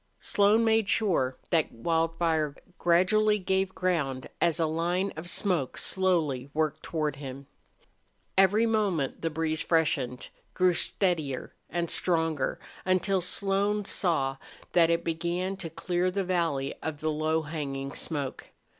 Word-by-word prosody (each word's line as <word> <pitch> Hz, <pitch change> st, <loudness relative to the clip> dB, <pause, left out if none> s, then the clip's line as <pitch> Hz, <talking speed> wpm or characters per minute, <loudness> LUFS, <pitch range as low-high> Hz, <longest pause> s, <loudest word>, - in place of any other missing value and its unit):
Slone 205 Hz, +3 st, +3 dB
made 220 Hz, -2 st, +2 dB
sure 150 Hz, -, +1 dB
that 165 Hz, -3 st, +2 dB
Wildfire 165 Hz, +2 st, 0 dB, 0.2 s
gradually 210 Hz, +5 st, +3 dB
gave 190 Hz, 0 st, -1 dB
ground 145 Hz, -8 st, -1 dB
as 165 Hz, -2 st, +3 dB
the 165 Hz, -2 st, +2 dB
line 175 Hz, +5 st, -1 dB
of 160 Hz, +3 st, -6 dB
smoke 175 Hz, -9 st, -1 dB
slowly 160 Hz, -9 st, +2 dB
worked 155 Hz, -1 st, 0 dB
toward 150 Hz, -4 st, -2 dB
him. 135 Hz, -1 st, -8 dB, 0.9 s
Every 195 Hz, +4 st, +4 dB
moment 200 Hz, -, 0 dB
the 165 Hz, -, 0 dB
breeze 160 Hz, 0 st, -1 dB
freshened, 145 Hz, -7 st, 0 dB, 0.3 s
grew 180 Hz, -1 st, +4 dB
steadier 165 Hz, -8 st, -1 dB, 0.2 s
and 170 Hz, 0 st, -2 dB
stronger, 160 Hz, -5 st, +1 dB, 0.2 s
until 185 Hz, +1 st, +1 dB
Slone 200 Hz, +3 st, +2 dB
saw 140 Hz, -10 st, 0 dB, 0.3 s
that 170 Hz, -2 st, +4 dB
it 170 Hz, 0 st, +1 dB
began 175 Hz, +3 st, -2 dB
to 175 Hz, -4 st, -5 dB
clear 175 Hz, +3 st, -1 dB
the 195 Hz, +2 st, -1 dB
valley 165 Hz, -7 st, 0 dB
of 155 Hz, -2 st, -4 dB
the 155 Hz, 0 st, 0 dB
low 155 Hz, +1 st, 0 dB
hanging 140 Hz, -3 st, -4 dB
smoke. 145 Hz, -5 st, -4 dB
165 Hz, 130 wpm, -28 LUFS, 150-185 Hz, 0.9 s, Every